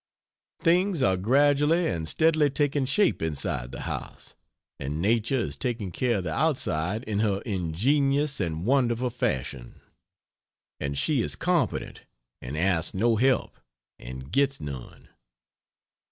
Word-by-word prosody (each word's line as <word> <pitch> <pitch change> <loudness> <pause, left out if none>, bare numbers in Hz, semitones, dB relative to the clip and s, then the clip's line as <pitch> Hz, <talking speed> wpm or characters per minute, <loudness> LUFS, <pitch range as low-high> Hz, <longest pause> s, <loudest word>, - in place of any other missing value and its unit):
Things 175 -2 +2
are 95 -1 +3
gradually 145 - +3
and 80 -3 -2
steadily 160 -2 +3
taking 145 0 0
shape 200 +10 +2
inside 70 -6 -2
the - - -7
house, - - -6 0.5
and 75 +3 -4
nature 115 +7 +1
is 120 - -2
taking 115 -7 -3
care 120 +4 0
of 95 - -3
the 80 -3 -3
outside 110 - 0
in 105 -3 -2
her 105 -3 +1
ingenious 135 - +1
and 85 -2 -2
wonderful 125 -1 +2
fashion 65 - -3 1.0
and 70 -1 -3
she 140 - +1
is - - -1
competent 170 -9 -1 0.4
and 65 +5 -6
asks 85 -1 +1
no 115 +4 +3
help 130 +3 +1 0.4
and 65 +3 -9
gets 140 0 +2
none. 70 -4 -8
115 Hz, 130 wpm, -26 LUFS, -, 1.0 s, are